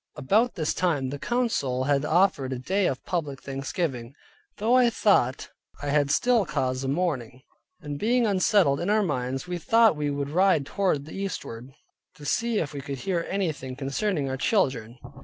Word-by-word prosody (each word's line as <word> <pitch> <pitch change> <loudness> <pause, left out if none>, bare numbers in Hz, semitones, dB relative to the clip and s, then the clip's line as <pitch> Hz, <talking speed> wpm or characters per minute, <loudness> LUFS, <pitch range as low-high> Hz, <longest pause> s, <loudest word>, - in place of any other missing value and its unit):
About 210 - +2
this 155 -4 -1
time 145 -8 0
the 145 - -5
council 225 - 0
had 140 0 +1
ordered 155 -5 +2
a - - -3
day 190 +10 0
of 130 - -3
public 150 -6 -3
thanksgiving. 135 -2 -4 0.4
Though 220 +4 +1
I 250 -1 +6
thought 170 - +1 0.3
I 145 - -2
had 145 -1 +2
still 240 +7 +3
cause 130 -6 -2
of 135 - -2
mourning, 135 -6 -2 0.4
and 145 -1 -6
being 240 +2 +2
unsettled 190 -7 +3
in 175 - -2
our 215 0 +3
minds, 130 -5 -2
we 180 -1 -3
thought 225 +2 +4
we 150 -1 -2
would 140 0 -3
ride 185 -4 +3
toward 165 -5 0
the 155 - -10
eastward, 135 -11 -5 0.5
to 145 - -12
see 230 +7 0
if 150 -6 -2
we 140 - -5
could 140 0 -5
hear 175 0 -1
anything 155 -9 -2
concerning 145 +4 -1
our 130 0 -3
children. 130 - 0
150 Hz, 175 wpm, -26 LUFS, 135-195 Hz, 0.5 s, I